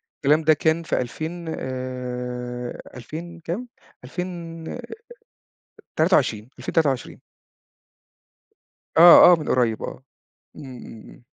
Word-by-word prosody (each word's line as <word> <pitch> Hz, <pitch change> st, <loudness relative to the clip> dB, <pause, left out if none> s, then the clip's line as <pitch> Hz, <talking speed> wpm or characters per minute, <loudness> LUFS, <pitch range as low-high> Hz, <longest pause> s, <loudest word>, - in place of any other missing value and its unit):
الكلام 150 Hz, +3 st, +2 dB
ده 155 Hz, 0 st, +5 dB
كان 160 Hz, +2 st, 0 dB
في 155 Hz, -, -1 dB
2000 160 Hz, +7 st, -6 dB
آآ 125 Hz, -1 st, -5 dB
2000 165 Hz, +7 st, -8 dB
كام؟ 185 Hz, +10 st, -5 dB, 0.4 s
2000 165 Hz, +2 st, -6 dB, 1.3 s
23 130 Hz, -, +2 dB
2023. 140 Hz, -6 st, -1 dB, 1.8 s
آه، 175 Hz, +1 st, +10 dB
آه، -, -, +7 dB
من 150 Hz, -, -5 dB
قريب 120 Hz, -4 st, +1 dB
آه، 130 Hz, -, -7 dB, 0.5 s
امم، 145 Hz, -, -10 dB
امم، -, -, -11 dB, 0.3 s
امم. 120 Hz, -, -18 dB
150 Hz, 100 wpm, -23 LUFS, 125-165 Hz, 1.8 s, آه